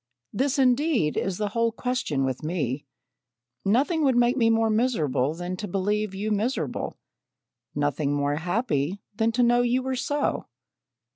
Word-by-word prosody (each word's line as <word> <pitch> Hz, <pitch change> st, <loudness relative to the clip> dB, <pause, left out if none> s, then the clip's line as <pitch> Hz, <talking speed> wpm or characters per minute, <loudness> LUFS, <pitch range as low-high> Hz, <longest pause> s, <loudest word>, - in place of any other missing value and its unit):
This, 265 Hz, +6 st, 0 dB
indeed, 260 Hz, -, +2 dB
is 190 Hz, -1 st, -1 dB
the 210 Hz, -1 st, -1 dB
whole 230 Hz, +2 st, +1 dB
question 230 Hz, -, -1 dB
with 130 Hz, -1 st, -3 dB
me. 145 Hz, -4 st, -2 dB, 0.8 s
Nothing 285 Hz, -, +2 dB
would 265 Hz, -3 st, +3 dB
make 240 Hz, +1 st, +3 dB
me 230 Hz, -4 st, +3 dB
more 225 Hz, -1 st, +3 dB
miserable 160 Hz, -, +1 dB
than 175 Hz, +2 st, -4 dB
to 210 Hz, -, -5 dB
believe 205 Hz, +2 st, -1 dB
you 210 Hz, +3 st, -2 dB
miserable 220 Hz, +6 st, -2 dB, 0.8 s
nothing 145 Hz, 0 st, 0 dB
more 145 Hz, 0 st, 0 dB
happy 175 Hz, -, -1 dB, 0.2 s
than 225 Hz, +1 st, +2 dB
to 245 Hz, +1 st, +3 dB
know 240 Hz, 0 st, +4 dB
you 245 Hz, +1 st, +1 dB
were 260 Hz, 0 st, -1 dB
so." 290 Hz, +3 st, -1 dB
215 Hz, 150 wpm, -26 LUFS, 160-245 Hz, 0.8 s, know